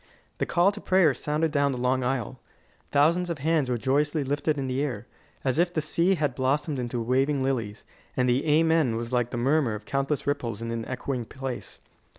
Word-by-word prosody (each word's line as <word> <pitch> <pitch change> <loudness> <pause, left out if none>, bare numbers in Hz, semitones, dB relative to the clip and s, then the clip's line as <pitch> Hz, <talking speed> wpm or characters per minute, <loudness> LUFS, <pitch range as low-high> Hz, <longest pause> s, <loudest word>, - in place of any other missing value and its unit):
The - - 0
call 175 +3 +3
to 210 - -9
prayer 185 -6 +4
sounded 150 +4 -1
down 140 -1 +2
the - - -4
long 125 +1 +1
aisle. 130 -1 -2 0.5
Thousands 170 +5 +3
of 170 - -2
hands 150 -2 +1
were 125 - +1
joyously 145 +5 +1
lifted 145 +2 -1
in 135 - -2
the 130 +1 -1
air, 135 -5 -3 0.4
as 135 +3 0
if 175 +1 +3
the 170 - -1
sea 170 +5 +2
had 150 -5 0
blossomed 140 +2 0
into 120 0 -3
waving 135 +4 +1
lilies, 115 -6 -2 0.3
and 125 0 +2
the 125 +2 +2
"Amen" 160 -5 +3
was 115 +2 -4
like 120 -1 +1
the 120 - -4
murmur 135 -2 +2
of 105 0 -9
countless 140 +2 -1
ripples 120 -7 -2
in 115 0 -4
an 115 -1 -3
echoing 130 -1 -3
place. 135 +1 -6
135 Hz, 200 wpm, -26 LUFS, 125-150 Hz, 0.5 s, prayer